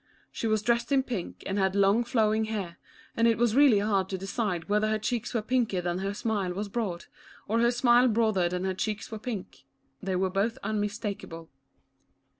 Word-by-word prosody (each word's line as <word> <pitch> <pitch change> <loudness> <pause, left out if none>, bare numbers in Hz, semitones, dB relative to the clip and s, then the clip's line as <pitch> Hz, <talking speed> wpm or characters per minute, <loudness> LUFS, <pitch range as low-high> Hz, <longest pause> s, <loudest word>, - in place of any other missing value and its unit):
She 230 - -3
was 215 -1 +1
dressed 235 +3 +1
in 270 -1 +4
pink 230 -9 -5
and 195 +1 -1
had 190 0 +1
long 200 +4 +4
flowing 220 -2 +1
hair, 200 -6 -5 0.4
and 230 0 +3
it 230 - +3
was 235 -1 +2
really 275 -6 +6
hard 200 -2 +1
to 190 - -2
decide 195 -3 -3
whether 210 +1 +2
her 215 - +1
cheeks 225 +2 -2
were 230 -3 -1
pinker 230 -5 0
than 175 0 -2
her 195 +1 -3
smile 205 -5 -1
was 205 +1 -3
broad, 195 -6 -3 0.4
or 225 +3 +1
her 235 +1 +4
smile 240 0 +4
broader 215 -6 +2
than 180 +1 -3
her 190 0 0
cheeks 210 +3 -3
were 220 - -5
pink 215 -4 -6 0.2
— 135 - -43
they 190 -1 -2
were 185 0 0
both 210 +5 0
unmistakable. 205 -5 -4
210 Hz, 200 wpm, -28 LUFS, 190-230 Hz, 0.4 s, really